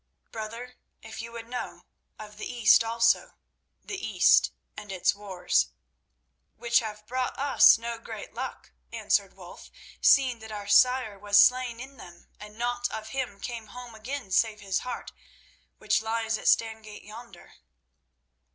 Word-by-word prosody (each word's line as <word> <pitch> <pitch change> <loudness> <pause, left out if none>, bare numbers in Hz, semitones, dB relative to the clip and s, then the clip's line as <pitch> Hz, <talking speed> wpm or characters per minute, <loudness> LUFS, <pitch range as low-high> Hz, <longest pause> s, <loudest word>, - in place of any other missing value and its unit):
"Brother, 230 +3 -7 0.3
if 220 0 -8
you 230 0 -9
would 230 -1 -8
know, 245 +1 -6 0.3
of 210 -1 -11
the - - -6
East 235 -2 +5
also—the 230 - -2
East - - +4 0.2
and 205 - -9
its 185 -2 +1
wars." 190 - 0 0.9
"Which 235 0 +2
have 210 -2 -7
brought 255 +2 -3
us 280 -4 +6
no 230 0 -5
great - - -9
luck," - - -7 0.2
answered - - 0
Wulf, - - -13 0.3
"seeing 260 -4 +4
that 220 0 -10
our 205 -1 -6
sire 235 0 +3
was 205 0 +4
slain 250 +1 +4
in 270 +2 -10
them 175 -5 -14
and 210 +1 -12
naught 245 +1 -1
of 220 0 -7
him 245 -6 -4
came 230 -1 -6
home 245 +2 -10
again 235 0 -7
save 215 +2 +2
his 195 -2 -1
heart, 250 - -6 0.7
which - - +1
lies 225 0 -1
at - - -5
Stangate 220 -2 0
yonder." 215 -3 -13
225 Hz, 145 wpm, -27 LUFS, 210-245 Hz, 0.9 s, us